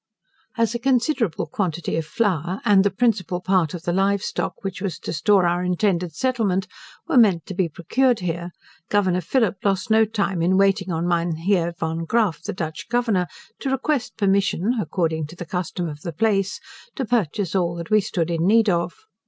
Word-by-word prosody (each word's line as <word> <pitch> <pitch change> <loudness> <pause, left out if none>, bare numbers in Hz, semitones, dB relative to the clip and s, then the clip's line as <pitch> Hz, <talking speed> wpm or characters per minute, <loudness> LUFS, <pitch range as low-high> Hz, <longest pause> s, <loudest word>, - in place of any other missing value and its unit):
As 230 0 +1
a 235 - -2
considerable 250 - +1
quantity 170 0 -2
of 160 -1 -2
flour, 185 -4 -1
and 195 -2 +5
the 200 - +3
principal 195 -4 0
part 185 -3 +1
of 170 - -8
the 175 - -1
live 195 +1 +1
stock, - - -3
which 195 -2 -4
was 195 -4 -3
to - - -5
store 180 +4 +3
our 175 +1 +1
intended 180 -2 0
settlement, 215 -6 0 0.4
were 255 - +4
meant 190 -8 +4
to - - -6
be 185 -2 0
procured 245 - +1
here, 170 0 -3 0.4
Governor 185 -3 +2
Phillip 210 +1 +1
lost 195 +2 0
no 220 0 +5
time 200 -5 -1
in 185 +3 +3
waiting 195 -1 +2
on 165 +1 -1
Mynheer 170 +1 0
Van 165 0 -2
Graaffe, 215 -4 +1
the - - -4
Dutch 160 0 -5
Governor, 225 -7 +1 0.3
to 270 - -2
request 270 0 -1
permission 200 +1 +1
(according 160 -3 -1
to 165 - -12
the 175 - -7
custom 180 0 -3
of 150 -1 -7
the 170 - -5
place) 195 0 0 0.4
to 265 - -2
purchase 205 -5 0
all 175 -3 +1
that 170 +2 -7
we 215 0 +5
stood 175 -4 -2
in 165 +1 0
need 225 +1 +5
of. 170 -2 0
185 Hz, 185 wpm, -23 LUFS, 170-215 Hz, 0.4 s, and